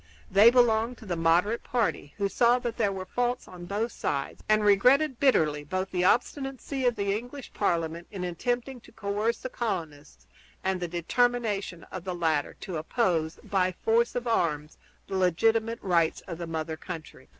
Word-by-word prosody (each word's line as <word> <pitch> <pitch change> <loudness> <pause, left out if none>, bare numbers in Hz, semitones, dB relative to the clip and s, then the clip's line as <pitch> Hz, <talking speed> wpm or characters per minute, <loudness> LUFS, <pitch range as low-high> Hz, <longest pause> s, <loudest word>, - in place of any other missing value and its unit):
They 205 +4 +8
belonged 240 -1 +3
to - - -13
the 180 -3 -2
moderate 170 +7 +2
party, 230 -11 -1
who 200 -1 +1
saw 235 +4 +3
that 240 -2 -4
there 205 -3 +2
were 190 -1 -5
faults 245 +5 -1
on 175 -1 -10
both 215 +5 -1
sides 140 -1 -3
and 215 0 +4
regretted 250 +7 +4
bitterly 155 - +3
both 185 +5 -3
the 180 -1 0
obstinacy 270 +4 0
of 240 - +2
the 200 -1 0
English 245 +5 -7
Parliament 170 -3 -1
in 190 -3 -6
attempting 245 +8 -2
to - - -17
coerce 215 +2 -1
the 255 - -4
colonists 160 - -5 0.4
and 190 -1 0
the 175 - -2
determination 200 +1 0
of 185 - -6
the 185 -1 -4
latter 160 -4 0
to 185 -5 -4
oppose, 165 -2 0
by 185 -2 +1
force 230 +5 +1
of 245 0 -2
arms, 155 -9 -1 0.3
the 195 - -5
legitimate 225 +6 +2
rights 170 -4 +2
of 170 -2 -8
the 170 - -4
mother 160 -1 -3
country. 165 -2 -9
200 Hz, 170 wpm, -28 LUFS, 170-235 Hz, 0.4 s, They